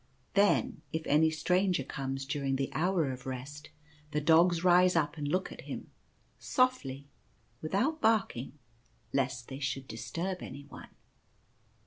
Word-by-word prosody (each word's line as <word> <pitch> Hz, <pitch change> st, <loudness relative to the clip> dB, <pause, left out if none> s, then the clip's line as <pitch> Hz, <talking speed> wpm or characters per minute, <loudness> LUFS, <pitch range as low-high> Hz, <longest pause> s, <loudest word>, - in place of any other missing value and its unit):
Then 200 Hz, -6 st, +3 dB
if 160 Hz, 0 st, -3 dB
any 155 Hz, +2 st, +4 dB
stranger 180 Hz, +1 st, +1 dB
comes 135 Hz, 0 st, -4 dB
during 140 Hz, -1 st, -1 dB
the 135 Hz, 0 st, -2 dB
hour 170 Hz, -4 st, +1 dB
of 130 Hz, 0 st, -8 dB
Rest, 135 Hz, +4 st, -6 dB, 0.4 s
the 150 Hz, -, 0 dB
dogs 165 Hz, +3 st, +4 dB
rise 180 Hz, 0 st, +5 dB
up 165 Hz, -1 st, +1 dB
and 150 Hz, -2 st, -3 dB
look 185 Hz, +6 st, 0 dB
at -, -, -9 dB
him, -, -, -6 dB, 0.5 s
softly, 145 Hz, -, 0 dB, 0.6 s
without 245 Hz, -, 0 dB
barking, 195 Hz, -, +1 dB, 0.6 s
lest 125 Hz, -3 st, -1 dB
they 135 Hz, 0 st, -7 dB
should 130 Hz, -1 st, -3 dB
disturb 165 Hz, +12 st, -4 dB
anyone. 140 Hz, +2 st, -9 dB
150 Hz, 130 wpm, -31 LUFS, 135-180 Hz, 0.6 s, rise